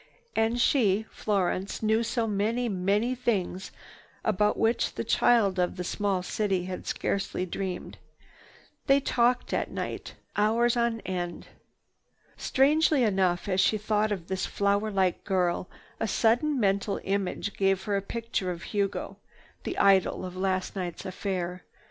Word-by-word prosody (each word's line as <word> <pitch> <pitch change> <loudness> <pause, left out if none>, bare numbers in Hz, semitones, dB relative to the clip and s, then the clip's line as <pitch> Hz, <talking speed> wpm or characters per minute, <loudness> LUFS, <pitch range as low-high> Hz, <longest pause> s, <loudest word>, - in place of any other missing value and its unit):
And 225 +2 +1
she, 220 -5 +3
Florence, 195 0 -1
knew 220 +1 +3
so 235 0 0
many, 220 +4 0
many 205 +4 +1
things 205 -7 -1 0.6
about 210 0 +2
which 225 +2 +1
this - - -3
child 205 -6 +3
of 180 +1 0
a - - -1
small 195 0 -1
city 190 -2 -1
had 185 0 -6
scarcely 190 -2 -1
dreamed. 185 0 -5 0.9
They 275 0 +6
talked 245 -2 +1
at - - 0
night, - - -5 0.2
hours 230 +3 +3
on 235 -1 0
end. 175 -2 -4 0.9
Strangely 295 +1 +3
enough 190 -4 +1
as 185 -1 +2
she 215 - +3
thought 215 0 0
of 185 -5 -3
this 190 +1 -2
flower 200 +1 +1
like 190 -3 0
girl, 180 -2 0 0.3
a 225 - 0
sudden 245 +8 +2
mental 200 -1 +1
image 200 0 -2
gave 195 -1 +1
her 205 0 -1
a 195 - +1
picture 225 -2 -3
of 170 -2 -5
Hugo, 200 -2 -2 0.5
the - - -3
idol 190 -1 +3
of 180 0 -7
last 185 0 -1
night's 180 -3 -4
affair. 185 -1 -3
200 Hz, 140 wpm, -28 LUFS, 185-225 Hz, 0.9 s, They